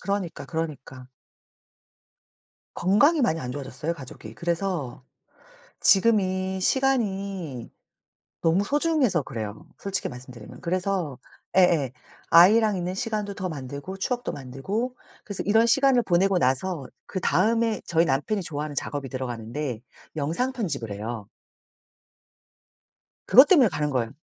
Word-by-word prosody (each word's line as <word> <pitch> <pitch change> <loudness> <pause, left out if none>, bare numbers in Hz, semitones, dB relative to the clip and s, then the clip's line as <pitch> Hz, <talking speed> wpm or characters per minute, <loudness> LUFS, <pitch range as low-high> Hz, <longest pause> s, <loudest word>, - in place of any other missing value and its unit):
그러니까, 195 -3 -3
그러니까. 145 -6 -5 1.7
건강이 285 - +3
많이 200 -11 +2
안 125 - -5
좋아졌어요 140 +3 -4
가족이. 125 -6 -10
그래서 170 -6 -3 0.8
지금이 190 -2 +3
시간이 195 - -1 0.7
너무 170 +4 +3
소중해서 290 - +2
그래요 110 -4 -6
솔직히 195 -1 -3
말씀드리면. 125 -3 -11
그래서 180 -5 -1 0.4
예예 165 -8 +4 0.4
아이랑 210 +4 +6
있는 180 +1 -3
시간도 210 0 -3
더 185 -2 -4
만들고 140 +5 -7
추억도 245 +5 -2
만들고 190 - -4 0.3
그래서 200 -3 -4
이런 220 +3 +4
시간을 270 +1 +4
보내고 190 0 +2
나서 140 +1 0 0.2
그다음에 220 +4 +1
저희 165 0 +2
남편이 150 +9 0
좋아하는 150 -3 -5
작업이 140 0 -3
들어가는데 125 0 -4 0.3
영상 165 - -1
편집을 155 - -3
해요. 105 +1 -5 2.0
그것 260 +4 +8
때문에 285 - +6
가는 150 -3 -2
거예요. 120 -4 -1
175 Hz, 300 characters per minute, -25 LUFS, 135-205 Hz, 2.0 s, 그것